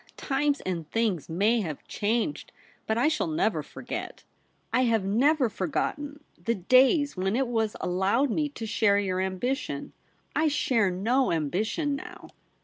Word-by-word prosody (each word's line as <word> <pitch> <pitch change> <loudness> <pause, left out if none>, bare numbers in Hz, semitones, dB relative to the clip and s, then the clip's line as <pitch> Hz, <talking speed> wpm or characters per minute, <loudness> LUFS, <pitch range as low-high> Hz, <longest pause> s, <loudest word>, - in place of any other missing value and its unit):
times 285 +1 0
and 170 -4 -4
things 215 -9 0
may 210 +8 +2
have 155 -7 -6
changed, 230 +7 -1 0.4
but 220 - +1
I 250 +5 +3
shall 310 -1 0
never 325 +3 0
forget - - -7 0.2
— - - -35
I 255 - +3
have 225 -4 +2
never 260 +7 +3
for 190 -4 -3
gotten 290 - -3
— - - -29
the 230 0 +1
days 260 - +4
when 190 +2 0
it 265 +1 +1
was 225 -3 0
allowed 195 +9 +1
me 300 +4 0
to 235 -5 -7
share 215 -2 +3
your 185 -2 0
ambition. 190 +9 -3 0.4
I 315 - +3
share 250 -8 +2
no 230 +9 +1
ambition 210 - -1
now.' 360 +4 -9
230 Hz, 160 wpm, -27 LUFS, 195-280 Hz, 0.4 s, days